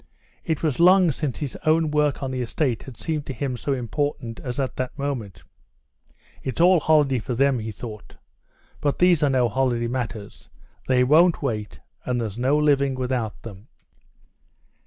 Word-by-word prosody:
It 160 -2 -2
was 155 -3 0
long 180 0 +6
since 140 -2 -3
his 145 -4 -5
own 155 0 +2
work 150 -2 +1
on 135 - -3
the 130 -1 -3
estate 125 0 -1
had 130 -4 -11
seemed 155 -3 -3
to 135 - -4
him 130 +1 -3
so 125 +4 -3
important 125 -1 -3
as 125 -1 -5
at 135 -2 -2
that 130 +2 -4
moment. 135 -9 -4 1.0
"It's 130 - -5
all 180 +1 +6
holiday 150 -5 +3
for 120 +2 -4
them," 135 0 +2
he 110 0 -5
thought; 105 -1 -10 0.6
"but 145 -2 0
these 175 -3 +4
are 145 - +3
no 130 -2 +2
holiday 120 0 0
matters, 115 -4 -5 0.4
they 125 -1 +3
won't 160 +5 +4
wait, 110 -6 -4 0.2
and 125 -1 -1
there's 110 -1 -4
no 135 +4 +2
living 140 -3 +2
without 125 -4 -3
them." 105 0 -10
130 Hz, 170 wpm, -23 LUFS, 120-150 Hz, 1.0 s, long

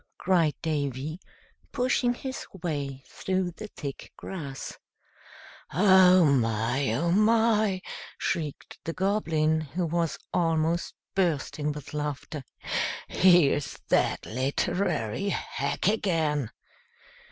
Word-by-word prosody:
cried 170 -5 +2
Davy, 150 0 -2 0.5
pushing 245 -1 +1
his 265 +1 -6 0.2
way 140 -5 -3
through 185 -1 -2
the 215 +5 -8
thick 140 -8 -7
grass. 140 -8 -6 0.9
"Oh, 185 0 +6
my! 120 -1 +1
oh, 170 +7 +1
my!" 215 -1 +3 0.3
shrieked 155 -4 -3
the 165 - -3
Goblin, 165 -5 +1
who 155 +4 -3
was 165 0 -1 0.2
almost 165 0 +1 0.2
bursting 155 -4 0
with 150 -1 -8
laughter. 150 0 -4 0.7
"Here's 175 -6 +4
that - - +2
literary 150 - -1
hack 185 - -2
again!" 160 - +1
165 Hz, 95 wpm, -27 LUFS, 145-185 Hz, 0.9 s, Oh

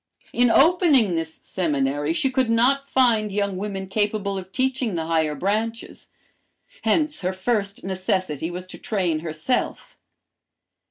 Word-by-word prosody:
"In 245 0 +4
opening 285 - +4
this 165 -1 -2
seminary 145 -4 -1
she 265 +10 0
could 260 -2 +1
not 270 +5 +2
find 225 -5 +3
young 200 -1 -1
women 195 0 -4
capable 205 0 -1
of 190 -1 -7
teaching 255 -4 -1
the 165 -1 -2
higher 160 -2 +1
branches, 220 +7 -3 0.7
hence 305 -2 +1
her 185 0 -1
first 200 +1 -2
necessity 185 -5 -2
was 180 +1 -6
to 185 - -11
train 180 -7 -1
herself. 160 +9 -3
200 Hz, 130 wpm, -23 LUFS, 175-240 Hz, 0.7 s, In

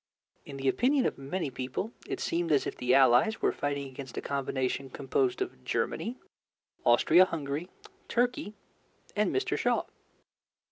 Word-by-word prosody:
In 140 - -7
the 135 0 -2
opinion 255 - +3
of - - -1
many 140 +2 -3
people, 130 - -4 0.2
it - - -3
seemed 170 -1 -1
as 145 - +3
if - - -4
the 125 +1 +2
Allies 135 - +5
were - - +2
fighting 140 -1 -2
against 130 -1 -9
a - - -1
combination 135 -1 -2
composed 370 - 0
of 370 - -10
Germany, 240 +3 -2 0.7
Austria 185 - +6
Hungary, 155 0 -4 0.4
Turkey, 245 -1 0 0.6
and 210 0 +2
Mr. 390 0 0
Shaw. - - +1
145 Hz, 145 wpm, -30 LUFS, 135-225 Hz, 0.7 s, Austria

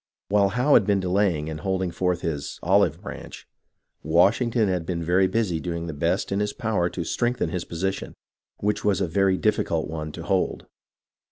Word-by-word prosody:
While 100 -1 +4
Howe 125 +7 +2
had 105 - +5
been 100 -1 +3
delaying, 90 -4 +1
and 80 -1 -5
holding 95 +1 -1
forth 90 0 -1
his 75 -4 -4
" - - -29
olive - - +3
branch," - - -9 0.5
Washington 105 - +3
had 90 -3 0
been 85 0 -3
very 90 +3 +3
busy 95 -3 0
in - - -6
doing 85 -1 -3
the 80 - -5
best 70 - -1
in 100 - 0
his 105 0 -1
power 105 -6 0
to 85 - -4
strengthen 120 +2 -1
his 90 0 -3
position, 95 +3 -3 0.4
which 105 +1 -1
was 100 -3 +2
a 95 - 0
very 95 +2 +2
difficult 85 -6 0
one 75 -1 -5
to 85 - -7
hold. 95 +1 -1
95 Hz, 190 wpm, -25 LUFS, 85-100 Hz, 0.5 s, had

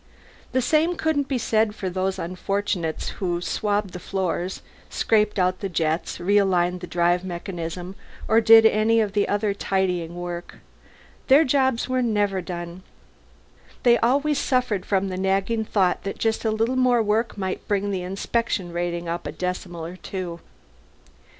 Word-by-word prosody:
The 260 - +1
same 320 +6 +2
couldn't 310 -4 0
be 270 - -1
said 220 -2 +1
for 190 - -4
the 185 +1 -2
unfortunates 185 -1 -2
who 175 -2 0
swabbed 205 +2 -1
the 180 - -6
floors, 185 -1 -3 0.3
scraped 215 -1 +1
out 185 -1 +1
the 195 - -3
jets, 160 -1 -1
realigned 180 -2 +2
the 180 - -7
drive 175 +1 +1
mechanism, 175 0 -5 0.3
or 225 +1 +4
did 225 0 +8
any 220 +1 +4 0.3
other 205 0 0
tidying 180 -4 -1
work. 175 0 -6 0.7
Their 280 +4 +7
jobs 265 -3 +1
were 255 0 0
never 205 -5 +1
done; 175 0 -6 1.0
they 240 -1 +5
always 285 +5 +2
suffered 250 -7 0
from 195 -1 +1
the 185 - -4
nagging 195 +4 0
thought 190 -4 +1
that 195 - -4
just 225 -1 0
a - - +3
little 225 +4 0
more 250 -2 +3
work 220 +2 0
might 190 -1 -4
bring 205 0 0
the 190 -2 -2
inspection 190 0 -2
rating 175 0 -2
up 170 +1 -3
a - - -4
decimal 180 -2 -4
or 175 +2 -8
two. 180 -3 -6
195 Hz, 150 wpm, -24 LUFS, 180-225 Hz, 1.0 s, did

